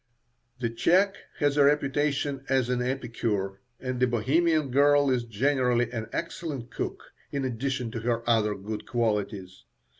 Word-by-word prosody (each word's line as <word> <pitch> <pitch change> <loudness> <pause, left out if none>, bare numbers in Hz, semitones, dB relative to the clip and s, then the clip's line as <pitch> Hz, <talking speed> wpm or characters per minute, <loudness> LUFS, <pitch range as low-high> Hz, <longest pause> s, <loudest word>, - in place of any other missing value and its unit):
The 115 -2 -1
Czech 185 - +3 0.2
has 145 -1 +1
a 145 - +6
reputation 140 -1 +1
as 130 -2 +2
an 125 -1 0
epicure, 115 -6 -2 0.2
and 130 -1 -3
the 125 - +4
Bohemian 145 +5 +2
girl 145 +1 +4
is 125 -2 0
generally 120 0 +1
an 115 -3 -4
excellent 145 -7 -4
cook, - - -5 0.2
in 140 -1 -1
addition 125 -1 -2
to 115 - -4
her 115 0 -1
other 110 -3 +3
good 105 +2 -6
qualities. 105 -5 -2
125 Hz, 145 wpm, -27 LUFS, 115-140 Hz, 0.2 s, a